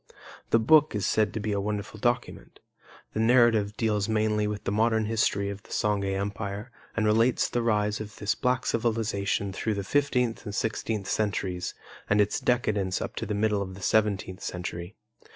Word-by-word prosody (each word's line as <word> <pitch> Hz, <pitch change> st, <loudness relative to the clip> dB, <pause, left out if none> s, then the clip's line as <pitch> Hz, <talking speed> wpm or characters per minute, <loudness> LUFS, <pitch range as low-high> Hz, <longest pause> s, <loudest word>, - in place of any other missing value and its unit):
The -, -, +5 dB
book 150 Hz, +4 st, +5 dB
is 100 Hz, -3 st, -1 dB
said 110 Hz, -1 st, +2 dB
to -, -, -1 dB
be 105 Hz, 0 st, -2 dB
a 100 Hz, -1 st, 0 dB
wonderful 105 Hz, +1 st, -4 dB
document. 120 Hz, +2 st, -2 dB, 0.5 s
The -, -, -2 dB
narrative 115 Hz, -3 st, +4 dB
deals 105 Hz, -2 st, 0 dB
mainly 105 Hz, -1 st, +1 dB
with 105 Hz, -1 st, -4 dB
the -, -, -2 dB
modern 110 Hz, +1 st, +2 dB
history 100 Hz, -2 st, +1 dB
of 100 Hz, 0 st, -8 dB
the -, -, -21 dB
Songhay 100 Hz, -2 st, 0 dB
Empire, 100 Hz, +3 st, -4 dB, 0.3 s
and 110 Hz, -, +2 dB
relates 115 Hz, +4 st, +3 dB
the 120 Hz, -, -1 dB
rise 105 Hz, -2 st, +1 dB
of 105 Hz, 0 st, -8 dB
this 105 Hz, 0 st, 0 dB
black 125 Hz, -1 st, 0 dB
civilization 110 Hz, -4 st, 0 dB
through 110 Hz, +2 st, -1 dB
the 100 Hz, -, -3 dB
fifteenth 125 Hz, -1 st, +1 dB
and 105 Hz, -2 st, -6 dB
sixteenth 110 Hz, -3 st, -2 dB
centuries 95 Hz, -4 st, -1 dB, 0.3 s
and 105 Hz, -, +3 dB
its 105 Hz, 0 st, +2 dB
decadence 105 Hz, -7 st, 0 dB
up -, -, -5 dB
to -, -, -3 dB
the 105 Hz, -, -1 dB
middle 105 Hz, -1 st, +1 dB
of 95 Hz, -1 st, -5 dB
the 95 Hz, -, -11 dB
seventeenth 100 Hz, -3 st, +1 dB
century. 90 Hz, +2 st, -5 dB
105 Hz, 180 wpm, -27 LUFS, 100-115 Hz, 0.5 s, The